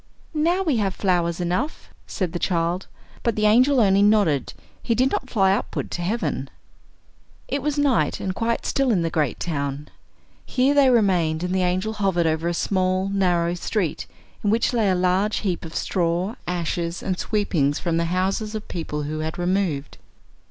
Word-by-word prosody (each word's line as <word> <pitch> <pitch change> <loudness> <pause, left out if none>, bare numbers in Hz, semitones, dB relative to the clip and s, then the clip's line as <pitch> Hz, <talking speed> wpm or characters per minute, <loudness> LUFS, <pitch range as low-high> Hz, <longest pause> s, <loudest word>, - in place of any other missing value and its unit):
"Now 340 +5 +1
we 305 -9 +1
have 195 -3 0
flowers 175 -3 0
enough," 180 - -2 0.2
said 180 -4 -3
the 175 - -2
child; 170 +1 -1 0.3
but 235 - 0
the 215 - +1
angel 250 +6 +5
only 200 -3 +4
nodded, 205 -9 +3 0.3
he 230 - 0
did 255 +3 +2
not 260 - -2
fly 195 -4 +3
upward 200 - -3
to 175 - -3
heaven. 215 +7 -2 1.0
It 280 - -2
was 295 +1 -1
night, 285 -4 +2
and 190 - -2
quite 230 +3 -1
still 275 -1 +1
in 190 -7 +2
the 165 - -1
great 150 -6 0
town. 145 -3 -3 0.5
Here 265 +2 +2
they 280 -2 +5
remained, 180 -9 +2
and 180 +1 -1
the 190 - +1
angel 185 +4 0
hovered 195 -5 +1
over 160 +1 0
a 175 - 0
small, 185 +1 0
narrow 175 -3 +1
street, 180 -1 -2 0.4
in 205 - +1
which 230 +4 +2
lay 225 -4 +2
a 185 - +2
large 185 +4 +1
heap 185 -5 -2
of 160 - -9
straw, 175 +3 0
ashes, 170 0 -2
and 185 -2 -2
sweepings 165 -10 0
from 170 -3 -1
the 170 - +1
houses 190 +5 -1
of 215 - -6
people 150 -3 -4
who 155 +2 -4
had 155 0 -4
removed. 175 -5 -1
185 Hz, 180 wpm, -23 LUFS, 170-215 Hz, 1.0 s, angel